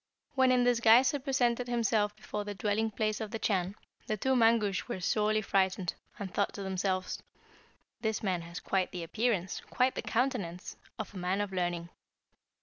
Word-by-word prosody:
"When 260 -2 +4
in 250 -1 +4
this 245 -1 +3
guise 235 +3 +6
he 285 - -2
presented 250 -3 +1
himself 220 -3 +1
before 210 -1 -5
the 205 0 -5
dwelling 215 +2 0
place 215 0 -1
of 220 - -3
the 225 - -3
Chan, 195 -3 0 0.3
the 215 - -1
two 265 +5 +1
Mangusch 225 -5 +3
were 240 -6 -3
sorely 215 +3 +1
frightened, 190 -2 +1 0.2
and 195 -3 -6
thought 200 - 0
to 200 - -6
themselves, 185 0 -1 0.8
'This 220 -2 -1
man 185 -4 0
has 170 +1 -7
quite 190 -1 0
the 175 -2 -5
appearance, 200 0 -1
quite 255 +1 +2
the - - -3
countenance, 225 -8 -2 0.2
of 215 - -5
a - - -8
man 180 +2 0
of 205 -2 -2
learning.' 175 -2 -1
210 Hz, 180 wpm, -31 LUFS, 190-235 Hz, 0.8 s, guise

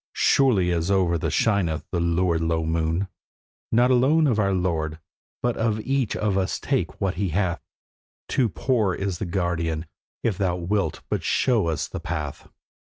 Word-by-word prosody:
surely 105 -10 +3
as 85 +1 0
over 90 -4 +2
us - - 0
shineth 95 -8 +1
the 90 - 0
lurid 85 0 +1
low 80 0 0
moon, 80 +3 0 0.6
'Not 120 +3 +4
alone 140 +6 +4
of 120 -7 +2
our 100 -2 +2
lord, 80 -4 -1 0.5
but 120 -1 +1
of 110 -1 0
each 135 -2 0
of 100 -2 +1
us 95 - -1
take - - -1
what 95 -2 0
he 100 - 0
hath! 85 0 0 0.7
Too 125 -4 +1
poor 110 -4 0
is 95 -3 -3
the 100 - -3
guerdon, 85 -3 -1 0.4
if 105 -6 0
thou 90 -3 +1
wilt 90 -2 -1
but - - -1
show 115 -8 +2
us 80 -3 -1
the - - -6
path. 75 -3 -5
95 Hz, 170 wpm, -24 LUFS, 85-105 Hz, 0.7 s, Not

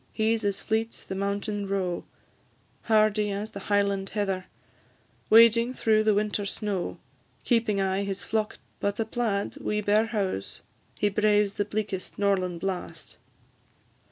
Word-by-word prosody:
He 220 +1 +2
's 225 - -5
as 200 -1 0
fleet 225 +1 -1
's - - -13
the - - -6
mountain 200 +1 -2
roe, 190 -3 -2 0.8
Hardy 215 -1 +3
as 205 +2 -4
the 200 - -7
Highland 200 -1 +1
heather, 195 -3 -2 0.8
Wading 230 +2 +6
through 215 -1 +3
the 215 -1 +3
winter 210 0 0
snow, 200 -3 -3 0.5
Keeping 230 -4 +2
aye 190 0 +1
his 200 0 -4
flock 215 -1 -1
together; - - -19 0.2
But 200 +1 -1
a 225 - +1
plaid, 220 -3 -2
wi' 210 0 -1
bare 210 +2 +3
houghs, 195 - -3 0.4
He 205 - +2
braves 210 0 +2
the 205 - -1
bleakest 210 -2 -4
norlan' 185 -3 +1
blast. 185 +1 -5
205 Hz, 150 wpm, -27 LUFS, 195-215 Hz, 0.8 s, Wading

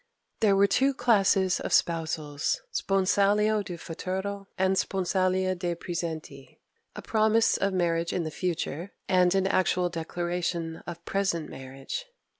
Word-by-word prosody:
There 205 -3 +4
were 200 +1 +5
two 270 +7 +2
classes 195 -6 +3
of - - -4
spousals 155 -3 0
sponsalia 205 +2 +2
de 175 -3 -6
futuro 190 +4 -4
and 190 0 +2
sponsalia 185 0 +1
de 175 -1 -2
praesenti: 165 -2 -6 0.4
a - - -7
promise 220 +1 +3
of 195 - 0
marriage 170 -2 0
in 175 - -1
the 155 - -4
future, 175 +1 -3
and 180 -1 +3
an 190 0 +2
actual 185 -1 +2
declaration 170 0 -3
of 170 0 -8
present 195 -5 -1
marriage. 135 - -7
185 Hz, 130 wpm, -27 LUFS, 170-195 Hz, 0.4 s, were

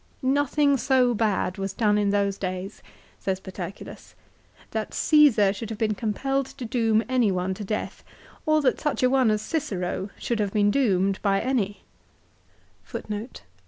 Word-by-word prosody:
" - - -35 0.2
Nothing 285 0 +2
so 255 -2 +3
bad 205 -4 0
was 195 0 -3
done 210 -1 +2
in 205 -1 +1
those 200 -1 0
days! 185 +1 -5 0.2
" - - -30
says 190 -1 -1
Paterculus. 190 0 -9 0.3
" - - -28
That - - -3
Csesar 260 -11 +5
should 220 +1 -6
have 220 - -5
been 215 -1 +1
compelled 265 +6 -1
to 265 -2 -8
doom 225 -1 +2
any 250 -5 +2
one 185 +1 -1
to 205 - -7
death 210 +2 -4 0.4
or 310 -1 +3
that 255 - +2
such 295 -4 -1
a 255 - +4
one 260 -3 +4
as 215 0 0
Cicero 200 - -3
should 235 -2 -2
have 205 -2 -1
been 205 -1 +3
doomed 195 -7 +1
by 195 -1 +2
any." 220 -5 -1
215 Hz, 165 wpm, -25 LUFS, 195-255 Hz, 0.4 s, Csesar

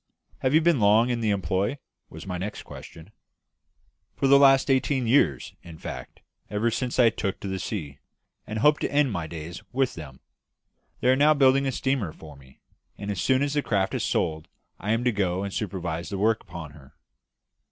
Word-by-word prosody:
"Have 130 +3 +1
you 160 - +6
been 165 -4 +3
long 110 +4 +4
in 120 -1 -2
the 110 - 0
employ?" 95 - 0 0.3
was - - -10
my 90 -2 -4
next 105 +3 -5
question. 80 +5 -12 1.0
"For - - -1
the 140 +1 +7
last 135 0 +5
eighteen 130 0 +1
years 115 - +2
in 85 -2 -12
fact, - - -8 0.3
ever 105 +3 0
since 125 +2 -2
I 120 -3 +5
first - - -12
took 100 -2 -2
to - - -6
the 95 -1 -3
sea 75 -9 -5 0.5
and 110 - -4
hope 150 +7 +4
to - - -2
end 145 -3 +2
my 85 -5 -3
days 80 +1 -8
with 130 0 0
them. 70 -5 -10 0.8
They 125 - +3
are 130 - +5
now 150 +3 +4
building 135 0 +4
a - - 0
steamer 130 - -1
for 75 -2 -13
me; 65 -1 -19 0.4
and 105 0 -4
as 95 - -3
soon 130 +1 +2
as 145 0 -1
this 145 -1 0
craft 100 -3 0
is - - -1
sold 80 -1 -1 0.3
I 105 - -2
am 115 +2 +1
to 125 - +2
go 95 -3 -1
and 100 -1 -5
supervise 85 -5 -4
the 100 - -4
work 110 +3 +2
upon 80 -3 -9
her." 70 0 -17
105 Hz, 205 wpm, -25 LUFS, 85-130 Hz, 1.0 s, the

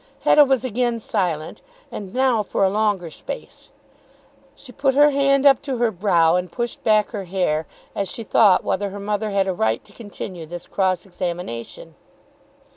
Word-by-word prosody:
Hetta 295 - +6
was 265 -2 +1
again 240 0 -1
silent, 175 -8 -3 0.3
and 195 -3 -7
now 255 -2 +2
for 200 - -1
a 190 - +3
longer 205 -5 0
space. - - -9 0.9
She 260 - -13
put 270 +2 0
her 295 +1 +6
hand 275 0 +2
up 275 -3 +6
to 275 -3 -3
her 235 -1 +1
brow 175 -4 +3
and 180 -1 -4
pushed 240 -1 -4
back 215 -2 +3
her 205 -4 -5
hair 175 -4 -1 0.3
as 200 - -3
she 230 - -6
thought 205 -3 +4
whether 200 +1 -1
her 200 +1 -8
mother 210 +1 -2
had 200 -1 +1
a 190 - 0
right 110 -8 -1
to - - -19
continue 190 -6 -8
this 175 +1 -8
cross 185 -2 -1
examination. 175 -10 -6
205 Hz, 175 wpm, -21 LUFS, 180-240 Hz, 0.9 s, Hetta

